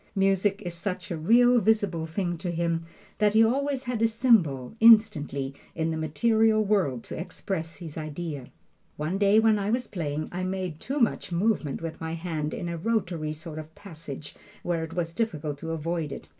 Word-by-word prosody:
Music 195 +1 +2
is 175 -2 -4
such 185 +2 -4
a - - -1
real, 240 +9 +5
visible 200 -7 +1
thing 175 +1 -2
to 175 +2 -4
him 170 -1 -1 0.3
that 210 0 +3
he 225 - +7
always 270 +3 0
has 245 -3 -3
a 225 - +5
symbol, 220 - +2
instantly, 200 -12 +5 0.2
in 165 0 0
the - - -2
material 215 +8 +2
world 180 - +1
to - - -7
express 165 -1 -5
his 165 -4 -7
idea. 155 -3 -5 0.5
One 155 +6 -2
day, 200 +1 +5
when 220 -1 +4
I 200 +1 -1
was 245 +3 0
playing, 155 -4 -3
I 180 +1 -3
made 185 -4 -3
too 275 +3 -3
much 230 -6 +1
movement 170 -5 0
with 165 -1 -6
my 160 0 -3
hand 160 -3 -3
in 175 - -4
a 170 0 -3
rotary 175 -6 -1
sort 155 0 -8
of 155 - -6
a 160 - -26
passage 155 -7 -9 0.3
where 170 -2 -1
it 160 +1 -7
was 170 -2 -2
difficult 155 -9 -2
to 165 - -6
avoid 165 -1 -2
it. 140 - -8
175 Hz, 190 wpm, -27 LUFS, 160-215 Hz, 0.5 s, he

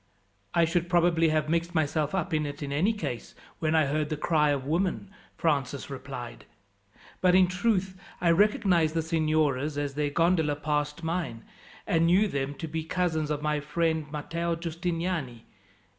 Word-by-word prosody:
"I 170 - +5
should 175 +1 -1
probably 170 -2 +3
have 155 -1 +1
mixed 170 +2 -1
myself 155 +1 0
up 180 -1 -2
in 155 -1 +1
it, 145 +1 -6
in 140 - -4
any 165 +10 +2
case, 210 - -5 0.2
when 160 0 +1
I 155 -2 +4
heard 150 +2 -1
the 155 - -2
cry 150 -1 +2
of 140 -2 0
women," 180 +5 -1 0.3
Francis 140 -4 -1
replied; 130 -3 -7 0.8
"but, 180 -1 +5
in 185 0 +7
truth, 185 0 -1 0.2
I 170 -1 +3
recognized 175 -4 +3
the 165 - +1
signoras 155 -3 +1
as 145 -1 -2
their 145 +1 0
gondola 160 -1 +2
passed 150 +1 -2
mine, 160 -8 -3 0.4
and 165 0 +2
knew 190 +5 +4
them 140 -5 -3
to 160 - -5
be 160 +1 -3
cousins 160 -3 -1
of 150 -1 -2
my 150 0 +1
friend 160 0 -1
Matteo 170 +3 -2
Giustiniani. 165 - -3
160 Hz, 165 wpm, -28 LUFS, 150-175 Hz, 0.8 s, in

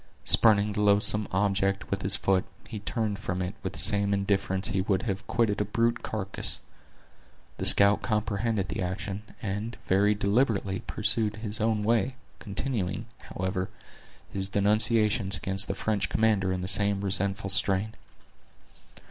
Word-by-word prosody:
Spurning 105 -2 +5
the 105 0 -2
loathsome 105 +1 +4
object 100 0 0
with 100 0 -2
his 95 0 +1
foot, 95 -2 +1 0.2
he 110 -1 -7
turned 105 0 -3
from 95 -3 -4
it 95 0 -3
with - - -5
the - - -9
same 100 0 +5
indifference 95 -1 0
he 95 - 0
would 95 -1 -1
have 100 -3 -4
quitted 110 -3 0
a - - +2
brute 115 +3 0
carcass. 100 -3 -1 1.0
The - - -1
scout 100 +1 +5
comprehended 105 -2 -1
the - - -4
action, 95 +2 -4 0.2
and 110 +3 -4
very 100 +3 +2
deliberately 100 -2 0
pursued 105 0 0
his 110 -1 -3
own 110 -1 0
way, 115 +3 +1 0.2
continuing, 105 -1 -4 0.2
however, 95 0 -3 0.6
his 95 0 -4
denunciations 105 0 +2
against 95 +1 -2
the - - -3
French 105 -2 -1
commander 105 -4 +1
in 90 -1 -3
the 90 - -4
same 100 0 +2
resentful 100 0 0
strain. 95 +2 +1
100 Hz, 150 wpm, -27 LUFS, 95-110 Hz, 1.0 s, Spurning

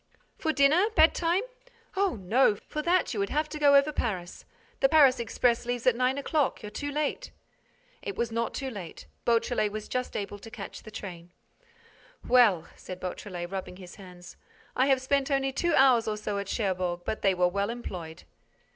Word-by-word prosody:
"For 315 - 0
dinner? 315 +8 +4
Bedtime—?" 335 +3 +3 0.5
"Oh, 390 -1 +1
no! 210 +4 +3
For 300 +8 -6
that, 345 0 +1
you 215 - -3
would 200 0 0
have 305 +1 0
to 305 - -6
go 285 -1 +6
over 280 +2 +5
Paris. 185 -11 -4 0.3
The 270 - +4
Paris 280 -5 +6
express 235 +1 +1
leaves 245 -1 -3
at 255 - +4
nine 255 +2 +1
o'clock. 285 -3 0
You're 210 - -7
too 285 +6 -4
late—" 295 0 -2 0.7
It 405 - -5
was 235 -1 -2
not 230 0 -2
too 270 -2 -4
late. 190 -7 -9 0.2
Beautrelet 230 -2 +1
was 215 0 -6
just 250 0 -3
able 205 0 -5
to 225 - -11
catch 220 -3 -8
the - - -11
train. 175 -5 -8 1.0
"Well," 220 -10 +4
said 185 -1 -9
Beautrelet, 180 -1 -6
rubbing 190 -2 -5
his 180 -1 -12
hands, 180 -3 -13 0.4
"I 260 - +3
have 265 -2 +2
spent 275 +1 +1
only 270 -1 +1
two 340 +4 0
hours 250 -4 +5
or 215 -1 -1
so 210 -1 -3
at 200 - -5
Cherbourg, 185 -5 -1
but 220 - -3
they 195 -1 +3
were 180 0 +3
well 200 +3 -1
employed." 180 -9 -7
235 Hz, 185 wpm, -28 LUFS, 195-280 Hz, 1.0 s, go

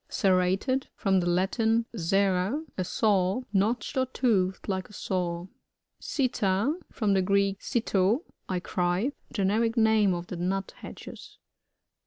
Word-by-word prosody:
Serrated. 195 +5 +1
— - - -52
From 195 -2 +2
the 175 - -1
Latin, 220 +6 +1
serrat 195 - +1
a 185 - -1
saw. 195 +2 +1
Notched 215 +8 0
or 260 0 +2
toothed 200 -8 0
like 190 -2 -2
a - - -15
saw. 175 -3 -2 0.6
SiTTA. 225 -2 0
— - - -40
From 210 -4 0
the 190 - +3
Greek, 200 +1 +1
sitt^, 220 - +1 0.3
I 185 -1 0
cry. 180 +7 0 0.2
Generic 225 +4 +1
name 220 -4 +4
of 175 0 -5
the 180 - -6
Nuthatches. 190 +3 -5
195 Hz, 135 wpm, -28 LUFS, 185-225 Hz, 0.6 s, name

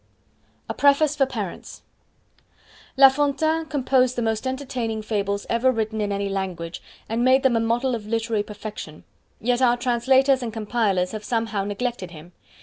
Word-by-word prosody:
A - - -3
Preface 285 +1 +3
For 270 -2 +2
Parents 215 -9 -6 1.1
La 270 0 +10
Fontaine 295 +4 0
composed 260 -3 +1
the 240 - -1
most 225 +2 -1
entertaining 255 -5 -3
Fables 200 -2 -2
ever 240 +3 +2
written 220 -2 -2
in 205 -1 -1
any 200 0 -1
language, 185 -4 -4 0.3
and 230 +2 -1
made 260 +1 +4
them 260 -3 +3
a - - +3
model 235 +3 0
of 215 -3 -5
literary 225 -1 0
perfection; 210 -6 -8 0.4
yet 245 +2 0
our 245 -1 +4
translators 260 +2 +3
and 235 -2 -4
compilers 210 -4 0
have 215 -1 -6
somehow 225 -3 -1
neglected 205 -1 -3
him. 170 +1 -13
230 Hz, 155 wpm, -23 LUFS, 210-260 Hz, 1.1 s, La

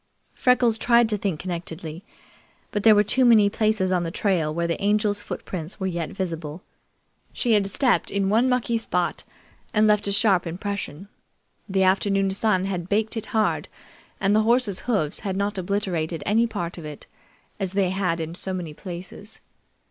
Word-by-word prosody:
Freckles 245 -3 +2
tried 235 0 +4
to 215 - 0
think 190 -6 -2
connectedly, 170 -1 -5 0.7
but 205 - -1
there 220 0 +7
were 205 - +5
too 235 +6 +2
many 220 -4 +6
places 215 -4 +1
on 180 -1 +2
the 165 - -2
trail 170 -4 0
where 170 +2 -1
the 170 0 -2
Angel's 205 0 +1
footprints 180 -3 -6
were 190 - -1
vet 170 -2 -3
visible. 165 -3 -5 0.7
She 240 - -1
had 205 -2 +3
stepped 250 +5 +2
in 200 -1 0
one 225 +6 +3
mucky 240 -2 +1
spot 180 -5 -1 0.5
and 215 +1 +5
left 210 -1 +3
a - - 0
sharp 195 -3 +3
impression. 190 -1 -5 0.6
The 190 0 +2
afternoon 195 +1 +2
sun 190 -1 +1
had 185 -2 -4
baked 220 +3 +1
it 225 -1 -4
hard, 220 -1 0 0.5
and 200 +1 +2
the 215 - +5
horses' 225 -4 +2
hoofs 160 -10 +1
had 190 -2 -3
not 200 0 -1
obliterated 175 -4 -2
any 225 +3 +3
part 175 -6 -4
of 160 - -9
it, 150 -1 -9 0.5
as 190 -1 -2
they 195 -2 +1
had 185 -3 -1
in 160 0 -4
so 185 +1 -4
many 170 -4 -5
places. 185 +5 -9
195 Hz, 175 wpm, -24 LUFS, 175-215 Hz, 0.7 s, there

